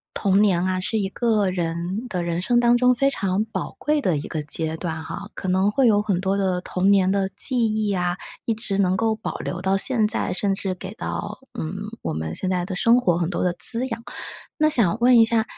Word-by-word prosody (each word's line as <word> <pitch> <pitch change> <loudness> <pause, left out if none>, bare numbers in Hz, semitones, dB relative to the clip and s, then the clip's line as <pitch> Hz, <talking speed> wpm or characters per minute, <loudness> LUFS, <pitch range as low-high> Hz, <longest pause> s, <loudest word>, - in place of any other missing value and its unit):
童 200 0 +2
年 185 -4 +3
啊， 185 0 0
是 220 +4 -1
一 195 - 0
个 215 -2 +1
人 175 +6 -3
的 180 -4 -2
人 170 0 -2
生 240 +5 +2
当 240 0 +4
中 250 +1 +4
非 275 +3 +2
常 200 -4 -1
宝 225 - -5
贵 300 0 +1
的 180 - +1
一 145 - -5
个 155 - -3
阶 160 +2 -3
段 160 -1 -4
哈， 200 +5 -7
可 - - -5
能 190 +2 +2
会 260 +3 +3
有 205 -2 +4
很 200 -4 0
多 190 +1 0
的 190 -2 0
童 185 +2 +1
年 190 -2 +4
的 195 -1 0
记 260 - +3 0.2
忆 215 -2 0
啊， 180 0 -1 0.3
一 230 - +1
直 215 -3 -3
能 185 -1 +2
够 225 +1 +1
保 220 - -5
留 180 0 -5
到 190 +1 +1
现 225 0 +2
在， 220 - -1
甚 195 +1 0
至 190 -1 -3
给 190 +2 -8
到， 210 -3 -5 0.2
嗯， 160 +4 -4 0.3
我 - - -3
们 80 +1 -4
现 185 - -3
在 180 -1 0
的 185 - -5
生 230 +6 +4
活 175 -9 +1
很 170 -1 -1
多 180 - -2
的 180 - +1
滋 245 +3 +3
养。 230 -2 -5 0.6
那 310 -1 +4
想 215 - +2
问 245 0 +6
一 225 - +8
下， 225 -1 +1
195 Hz, 255 characters per minute, -23 LUFS, 180-225 Hz, 0.6 s, 一